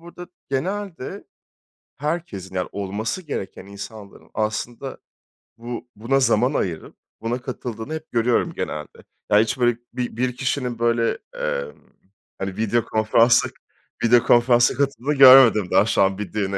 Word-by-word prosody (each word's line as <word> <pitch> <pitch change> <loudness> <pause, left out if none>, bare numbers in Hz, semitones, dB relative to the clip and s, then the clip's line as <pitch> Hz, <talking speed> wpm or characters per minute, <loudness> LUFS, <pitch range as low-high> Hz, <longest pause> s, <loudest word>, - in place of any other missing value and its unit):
burada 175 +1 -11 0.2
genelde 180 +2 -4 0.7
herkesin, 140 - -4
yani, 90 -1 -2
olması 100 - -3
gereken 95 - -6
insanların 100 +1 -11
aslında 115 +4 -3 0.6
bu 120 +1 -7
buna 125 +6 +1
zaman 125 +1 +2
ayırıp, 85 - -3 0.3
buna 120 +2 -2
katıldığını 125 0 -6
hep 160 0 -7
görüyorum 120 0 +1
genelde. 75 -1 -6 0.3
Ya, 105 - +6
hiç 110 +3 0
böyle 120 -1 +2 0.2
bi 125 -2 -4
bir 125 0 -1
kişinin 125 -3 -2
böyle, 115 0 +1 0.2
eee, - - -2 0.7
hani, 95 -1 -4
video 115 +1 +1
konferansa, 115 +2 +3 0.5
video 120 +1 +5
konferansa 120 0 +4
katıldığını 140 +1 -1
görmedim 130 -7 +8
daha 105 - +5
şu - - +1
an 95 0 +2
bir 100 -4 -6
düğüne 100 -2 -1
120 Hz, 135 wpm, -22 LUFS, 105-135 Hz, 0.7 s, görmedim